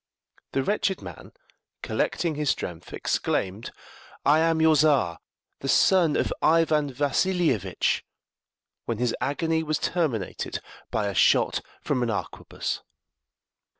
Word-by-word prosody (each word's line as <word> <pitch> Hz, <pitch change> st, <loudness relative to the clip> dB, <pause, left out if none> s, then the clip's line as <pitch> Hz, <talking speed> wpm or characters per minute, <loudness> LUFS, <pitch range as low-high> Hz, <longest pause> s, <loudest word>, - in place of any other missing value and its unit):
The 135 Hz, -, +1 dB
wretched 200 Hz, +2 st, 0 dB
man, -, -, -10 dB, 0.5 s
collecting 170 Hz, -2 st, -1 dB
his 150 Hz, -1 st, -1 dB
strength, 85 Hz, -8 st, -3 dB
exclaimed, 100 Hz, +4 st, -1 dB, 0.6 s
"I 150 Hz, +2 st, +5 dB
am 165 Hz, 0 st, +2 dB
your 160 Hz, 0 st, +5 dB
Czar, 135 Hz, -, +3 dB, 0.4 s
the 135 Hz, -, -4 dB
son 170 Hz, +2 st, +4 dB
of -, -, 0 dB
Ivan 155 Hz, -3 st, +3 dB
Vassilievitch!" 145 Hz, -, +1 dB, 0.8 s
when 115 Hz, -, -2 dB
his 120 Hz, 0 st, 0 dB
agony 160 Hz, +3 st, 0 dB
was 155 Hz, -1 st, -1 dB
terminated 140 Hz, -, -2 dB, 0.3 s
by 105 Hz, -, -1 dB
a 100 Hz, -, -2 dB
shot 90 Hz, -, +3 dB, 0.2 s
from 125 Hz, -, -1 dB
an 120 Hz, -, 0 dB
arquebuss. 105 Hz, -, -4 dB
145 Hz, 115 wpm, -26 LUFS, 115-160 Hz, 0.8 s, I